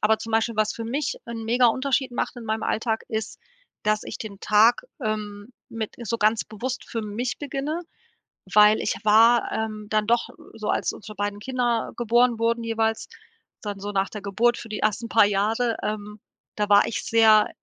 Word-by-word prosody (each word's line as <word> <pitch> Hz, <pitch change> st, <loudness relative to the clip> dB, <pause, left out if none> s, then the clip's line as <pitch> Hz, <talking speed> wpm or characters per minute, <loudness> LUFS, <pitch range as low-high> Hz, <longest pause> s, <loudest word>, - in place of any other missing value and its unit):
aber 215 Hz, +1 st, +3 dB
zum 225 Hz, 0 st, -7 dB
Beispiel, 225 Hz, 0 st, +1 dB
was 215 Hz, 0 st, +1 dB
für 230 Hz, -, -6 dB
mich 260 Hz, +4 st, -2 dB
'n 230 Hz, -1 st, -6 dB
mega 240 Hz, +2 st, +3 dB
Unterschied 260 Hz, +2 st, +1 dB
macht 245 Hz, -, -3 dB
in 235 Hz, -, -8 dB
meinem 220 Hz, 0 st, -2 dB
Alltag, 225 Hz, 0 st, -1 dB
ist, 220 Hz, -1 st, -4 dB, 0.5 s
dass 215 Hz, 0 st, +1 dB
ich 210 Hz, -, -7 dB
den 205 Hz, -3 st, -8 dB
Tag, 220 Hz, +3 st, +4 dB, 0.2 s
ähm, 210 Hz, 0 st, -4 dB, 0.2 s
mit 225 Hz, -2 st, -4 dB, 0.2 s
so 230 Hz, +3 st, -1 dB
ganz 215 Hz, +1 st, +2 dB
bewusst 240 Hz, +5 st, -5 dB
für 230 Hz, -, -3 dB
mich 220 Hz, +4 st, -3 dB
beginne, 290 Hz, +3 st, -3 dB, 0.7 s
weil 210 Hz, +1 st, +6 dB
ich -, -, -1 dB
war, 225 Hz, +3 st, +5 dB
ähm, 215 Hz, -1 st, -4 dB
dann 215 Hz, -1 st, +1 dB
doch 235 Hz, +1 st, +2 dB, 0.2 s
so, 215 Hz, -1 st, -5 dB
als -, -, 0 dB
unsere 215 Hz, 0 st, -10 dB
beiden 205 Hz, 0 st, -3 dB
Kinder 240 Hz, 0 st, -1 dB
geboren 240 Hz, 0 st, +3 dB
wurden 230 Hz, 0 st, +1 dB
jeweils, 225 Hz, -1 st, -1 dB, 0.5 s
dann 205 Hz, -2 st, -5 dB
so 205 Hz, +1 st, -5 dB
nach 195 Hz, 0 st, 0 dB
der 210 Hz, -, -7 dB
Geburt 225 Hz, +4 st, +1 dB
für 230 Hz, -, -8 dB
die 215 Hz, -, -4 dB
ersten 215 Hz, +2 st, 0 dB
paar 225 Hz, -, +6 dB
Jahre 220 Hz, +4 st, 0 dB
ähm, 210 Hz, 0 st, -4 dB, 0.4 s
da 210 Hz, -1 st, -1 dB
war 205 Hz, 0 st, +6 dB
ich -, -, -3 dB
sehr 220 Hz, -2 st, +5 dB
220 Hz, 185 wpm, -24 LUFS, 210-235 Hz, 0.7 s, weil